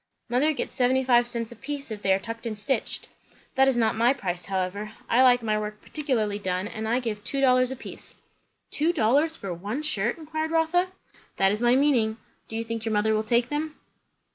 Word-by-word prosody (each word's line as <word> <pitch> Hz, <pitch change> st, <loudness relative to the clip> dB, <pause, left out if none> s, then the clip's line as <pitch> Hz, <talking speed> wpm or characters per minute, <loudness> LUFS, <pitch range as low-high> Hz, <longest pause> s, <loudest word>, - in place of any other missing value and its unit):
"Mother 260 Hz, +6 st, +3 dB
gets 295 Hz, -, -3 dB
seventy 260 Hz, 0 st, +2 dB
five 240 Hz, -2 st, +4 dB
cents 235 Hz, -2 st, -4 dB
a -, -, -9 dB
piece, 280 Hz, +1 st, -6 dB
if 210 Hz, -1 st, -5 dB
they 195 Hz, -, +2 dB
are 190 Hz, -, +5 dB
tucked 230 Hz, +4 st, -6 dB
and 215 Hz, -2 st, -4 dB
stitched." 265 Hz, +6 st, -1 dB, 0.5 s
"That 270 Hz, -1 st, +4 dB
is 265 Hz, -2 st, +2 dB
not 225 Hz, -1 st, +2 dB
my 235 Hz, +3 st, +4 dB
price, 180 Hz, -8 st, -4 dB
however. 195 Hz, +3 st, -3 dB
I 245 Hz, -, +4 dB
like 245 Hz, -2 st, +5 dB
my 215 Hz, -1 st, +1 dB
work 210 Hz, 0 st, -5 dB
particularly 230 Hz, -9 st, -1 dB
done, 185 Hz, 0 st, -2 dB
and 220 Hz, 0 st, -5 dB
I 235 Hz, +3 st, +2 dB
give 215 Hz, -4 st, -4 dB
two 275 Hz, -, -2 dB
dollars 255 Hz, -2 st, +4 dB
a 265 Hz, -, -4 dB
piece." -, -, -10 dB, 0.6 s
"Two 315 Hz, +3 st, +2 dB
dollars 295 Hz, +4 st, +2 dB
for 195 Hz, -3 st, -5 dB
one 205 Hz, -, -4 dB
shirt?" 240 Hz, -5 st, 0 dB
inquired 315 Hz, 0 st, -3 dB
Rotha. 330 Hz, +3 st, +2 dB, 0.5 s
"That 195 Hz, 0 st, +4 dB
is 210 Hz, +2 st, -2 dB
my 240 Hz, +1 st, +4 dB
meaning. 250 Hz, -6 st, +3 dB, 0.3 s
Do 225 Hz, -, -7 dB
you 225 Hz, -, -1 dB
think 230 Hz, -1 st, -4 dB
your 225 Hz, -1 st, -1 dB
mother 210 Hz, +1 st, +2 dB
will 215 Hz, -, +2 dB
take 235 Hz, +2 st, +1 dB
them?" 300 Hz, +1 st, -2 dB
235 Hz, 215 wpm, -26 LUFS, 215-270 Hz, 0.6 s, are